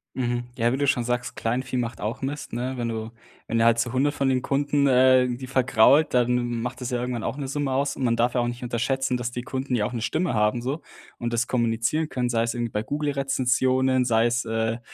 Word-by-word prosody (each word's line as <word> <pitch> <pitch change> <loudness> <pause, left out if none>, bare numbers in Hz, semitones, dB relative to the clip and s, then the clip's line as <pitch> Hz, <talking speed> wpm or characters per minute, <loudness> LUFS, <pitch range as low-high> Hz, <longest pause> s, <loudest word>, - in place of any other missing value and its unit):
Mhm, 120 -1 -1
ja, 120 +1 +2
wie - - 0
du 140 0 0
schon 125 -3 +2
sagst: 125 +1 -2
„Kleinvieh 125 +3 -2
macht 120 -2 -3
auch 110 +5 -3
Mist" 140 +2 -4
ne? 125 +2 -2
Wenn 120 -1 -2
du 110 0 -4 0.4
wenn 115 - 0
der 115 - +4
halt 115 0 +4
so 120 +1 -1
100 140 +3 +2
von 135 - 0
den 130 -1 +2
Kunden, 140 +1 +1
äh, 130 0 +5
irgendwie 125 +1 -3
vergrault, 135 +3 +4
dann 125 0 +3
m 120 -1 -2
macht 125 +2 -5
das 125 - -3
ja 125 -2 -1
irgendwann 125 -2 -3
auch 140 - -3
'ne 140 -2 -4
Summe 140 0 -2
aus, 140 +1 0
und - - -4
man 120 -2 +2
darf 120 +1 +2
ja 125 - +1
auch 120 - 0
nicht 120 +1 -5
unterschätzen, 125 +2 -1
dass 125 0 -3
die 125 0 -5
Kunden 130 0 -4
ja 105 -3 +1
auch 125 - -4
'ne 115 - -3
Stimme 155 +5 -1
haben 105 +2 +1
so 135 +6 -3 0.4
und 120 0 -2
das 115 +1 +1
kommunizieren 120 +6 0
können, 125 -1 -1
sei 115 -1 +1
es 115 - -1
irgendwie 120 -1 -2
bei 105 +1 -1
Google-Rezensionen, 130 -2 +1
sei 115 -1 +3
es, 120 +1 +1
äh, 110 +1 -1
125 Hz, 250 wpm, -25 LUFS, 120-130 Hz, 0.4 s, äh